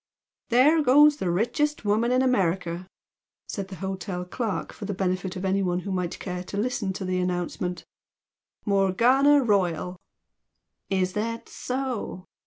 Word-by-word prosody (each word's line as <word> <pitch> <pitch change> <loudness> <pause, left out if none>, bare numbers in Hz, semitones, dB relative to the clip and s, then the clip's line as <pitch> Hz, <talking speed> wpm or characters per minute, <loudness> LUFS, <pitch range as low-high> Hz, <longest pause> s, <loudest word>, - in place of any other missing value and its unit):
"There 280 +7 +5
goes 295 +2 +6
the 185 - -2
richest 240 +10 0
woman 220 +4 +2
in 255 +1 +3
America!" 180 -7 0 0.6
said 195 -2 -4
the 190 - -8
hotel 185 0 -4
clerk 220 +2 -3
for 210 - -8
the 200 -1 -3
benefit 185 -1 -1
of 185 +1 -4
anyone 190 -2 +1
who 195 - -5
might 180 -2 -2
care 180 -2 -5
to 200 - -6
listen 215 -2 -1
to 190 - -5
the 185 0 0
announcement, 180 0 -2 0.8
"Morgana 240 +9 +4
Royal!" 180 -5 0 0.9
"Is 185 -1 0
that 230 +3 -3
so?" 250 -8 -4
195 Hz, 140 wpm, -26 LUFS, 180-240 Hz, 0.9 s, goes